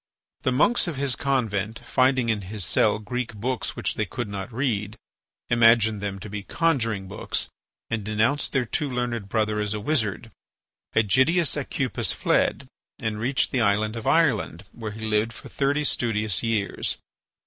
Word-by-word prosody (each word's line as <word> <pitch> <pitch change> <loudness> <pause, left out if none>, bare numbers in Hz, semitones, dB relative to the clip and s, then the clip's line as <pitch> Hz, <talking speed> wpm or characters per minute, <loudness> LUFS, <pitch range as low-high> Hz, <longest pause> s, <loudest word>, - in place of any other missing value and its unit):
The 130 - +1
monks 165 - +3
of 170 - -3
his 135 -1 +1
convent, 115 -6 -1
finding 130 -2 +2
in 110 -2 +1
his 100 0 -2
cell - - +3
Greek 115 +1 -4
books 125 +4 -2
which - - -1
they - - -1
could 120 -3 -4
not 100 +1 -5
read, 110 -4 -1 0.5
imagined 115 -3 +4
them 100 -1 -3
to 105 - -7
be 105 0 -5
conjuring 115 - 0
books, 100 +3 -2 0.4
and 115 -2 -2
denounced 110 +7 +1
their 130 -3 +1
too 145 +5 -1
learned 120 -5 -2
brother 105 -1 +1
as 105 0 -1
a - - -3
wizard. 110 - -1 0.6
Ægidius 130 - +3
Aucupis - - -1
fled, - - +1 0.3
and 110 -1 -3
reached 130 +4 +1
the 130 - +1
island 110 +1 +2
of 115 - -5
Ireland, 125 - +2
where 110 -2 -6
he 110 +1 -6
lived 110 +1 +1
for - - -11
thirty 140 +2 +1
studious 110 -8 0
years. 115 -4 -1
115 Hz, 160 wpm, -25 LUFS, 105-130 Hz, 0.6 s, imagined